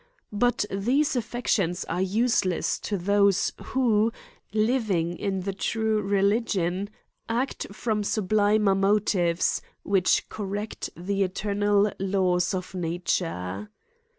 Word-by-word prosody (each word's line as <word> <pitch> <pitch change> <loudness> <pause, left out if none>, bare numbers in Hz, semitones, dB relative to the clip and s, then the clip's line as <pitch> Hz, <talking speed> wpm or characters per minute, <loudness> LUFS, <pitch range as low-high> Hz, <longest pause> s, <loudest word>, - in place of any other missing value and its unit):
But 245 0 +2
these 265 +10 +1
reflections 205 -7 0
are 175 +3 -2
use 220 +6 +2
less 185 -2 -1
to 205 - -2
those 200 +1 +2
who, 230 -4 +2 0.4
living 215 -6 +1
in 190 +1 -2
the 195 +1 -3
true 220 +2 0
religion, 200 -2 +1 0.4
act 245 +4 -2
from 210 0 -1
sublimer 210 0 +2
motives, 195 -3 +2 0.2
which 190 -2 +2
correct 205 +1 -5
the 195 +3 -2
eternal 205 +2 +1
laws 185 -1 +1
of 185 +1 -5
nature. 170 - -2
200 Hz, 105 wpm, -26 LUFS, 185-215 Hz, 0.4 s, But